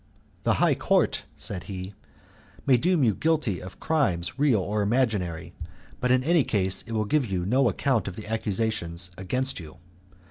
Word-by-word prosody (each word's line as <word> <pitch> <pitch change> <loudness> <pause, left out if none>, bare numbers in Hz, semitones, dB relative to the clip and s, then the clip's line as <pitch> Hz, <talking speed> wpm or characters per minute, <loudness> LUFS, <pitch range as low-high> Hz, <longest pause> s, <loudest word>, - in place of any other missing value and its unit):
"The - - +4
high - - +3
court," - - +1
said 95 -3 -6
he, 95 0 -6 0.7
"may 135 - +6
deem 165 +4 +2
you 110 -4 +4
guilty 155 - 0
of 95 +1 -10
crimes 135 - 0
real 140 -7 +4
or 105 +3 -1
imaginary; 100 -7 0 0.5
but 125 - 0
in 130 0 +4
any 170 +2 +4
case 95 -7 +1
it 115 - -5
will 110 -1 0
give 140 +3 +1
you 90 -3 -2
no 125 +5 +3
account 130 -8 0
of 90 - -5
the 110 - -7
accusations 105 -5 -2
against 130 +8 -2
you. 80 -2 -11
110 Hz, 170 wpm, -26 LUFS, 95-130 Hz, 0.7 s, may